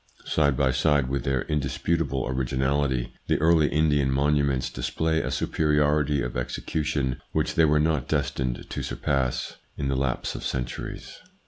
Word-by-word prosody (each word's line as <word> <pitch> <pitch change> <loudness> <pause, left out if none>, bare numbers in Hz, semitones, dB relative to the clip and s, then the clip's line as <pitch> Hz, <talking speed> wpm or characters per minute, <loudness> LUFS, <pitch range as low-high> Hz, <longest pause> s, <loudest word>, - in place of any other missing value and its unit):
Side 70 -4 +2
by 65 -1 +3
side 70 0 +2
with 70 +1 -2
their 65 -2 +1
indisputable 75 0 -1
originality, 65 0 0
the - - +2
early 80 -1 +4
Indian 75 -3 +2
monuments 70 -1 +1
display 80 +6 -1
a - - -3
superiority 75 -2 +1
of - - -4
execution 70 +1 -2
which - - 0
they 80 - +4
were 75 0 +3
not 75 -4 +1
destined 65 -4 -1
to - - -4
surpass 65 +1 -1 0.2
in 70 - -2
the 70 - 0
lapse 65 -2 -1
of - - -7
centuries. 60 -1 -5
70 Hz, 145 wpm, -26 LUFS, 65-75 Hz, 0.2 s, early